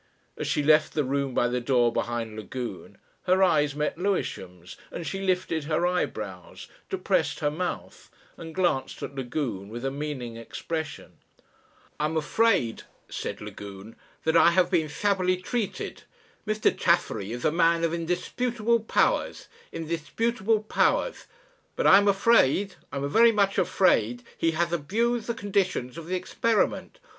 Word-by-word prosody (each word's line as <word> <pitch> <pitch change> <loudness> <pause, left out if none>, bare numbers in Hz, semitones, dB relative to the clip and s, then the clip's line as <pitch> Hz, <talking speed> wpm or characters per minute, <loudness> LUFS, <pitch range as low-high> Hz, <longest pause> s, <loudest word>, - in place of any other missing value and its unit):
As - - -4
she 150 - +1
left 155 +1 +4
the 150 - +2
room 140 0 -1
by 120 - +3
the 125 0 -1
door 120 -2 +2
behind 115 -2 -2
Lagune 110 -1 -7 0.3
her 185 +1 +4
eyes 150 -5 +3
met 150 +2 -2
Lewisham's, 95 - -3
and 170 - -6
she 195 +3 -4
lifted 180 -5 0
her 155 +3 +1
eyebrows, 105 - -3 0.2
depressed - - 0
her 145 - +1
mouth, 180 +4 -5 0.3
and 165 -1 -9
glanced 170 -8 0
at - - -5
Lagune 125 -7 -4
with 120 +4 -6
a 135 - 0
meaning 135 -5 -5
expression. 150 +6 -6 0.8
"I'm 155 +2 0
afraid," 160 - +1 0.3
said - - -5
Lagune, 100 +2 -9 0.3
"that 160 - +1
I - - +7
have 180 +1 +2
been 165 -4 +2
shabbily 185 +2 +1
treated. 210 +4 -4 0.5
Mr. 215 0 +2
Chaffery 110 - +1
is 120 +1 -5
a - - +4
man 165 0 +3
of 165 0 +1
indisputable 225 +7 0
powers 220 - 0 0.2
indisputable 210 +7 -1
powers; - - 0 0.5
but - - -1
I 195 - +8
am 205 - +1
afraid 200 - +3 0.2
I - - -7
am 140 +1 -1
very 230 +10 +6
much 200 -2 +2
afraid 120 - +2
he 165 0 +1
has 170 0 0
abused 220 +9 0
the 235 - -1
conditions 190 - -1
of 165 -1 -8
the 185 - -1
experiment. 225 - 0
165 Hz, 150 wpm, -26 LUFS, 130-195 Hz, 0.8 s, I